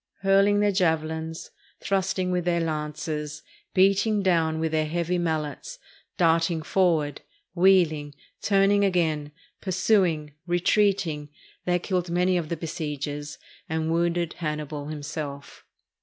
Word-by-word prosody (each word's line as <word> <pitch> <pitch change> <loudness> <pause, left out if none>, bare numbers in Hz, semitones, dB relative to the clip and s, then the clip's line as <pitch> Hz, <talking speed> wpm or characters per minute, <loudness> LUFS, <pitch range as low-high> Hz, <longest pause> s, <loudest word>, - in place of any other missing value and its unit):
Hurling 195 +1 +4
their 205 0 +3
javelins, 160 -3 -1 0.3
thrusting 190 -1 0
with 180 -1 0
their 175 0 +1
lances, 150 -1 -3 0.3
beating 200 +2 +3
down 165 -4 +2
with 160 0 -1
their 155 -1 +1
heavy 170 +2 -1
mallets, 160 - -3 0.4
darting 165 -2 +2
forward, 160 -6 +1 0.3
wheeling, 170 -6 +3 0.3
turning 200 0 +3
again, 160 -6 +1 0.3
pursuing, 180 -6 +1
retreating, 175 -4 +1 0.4
they 180 0 +2
killed 180 0 -2
many 180 +2 +2
of 170 -3 -1
the 170 - -2
besiegers, 150 -3 -5 0.3
and 160 0 -1
wounded 170 0 0
Hannibal 150 -2 -4
himself. 145 -2 -6
165 Hz, 110 wpm, -26 LUFS, 155-185 Hz, 0.4 s, Hurling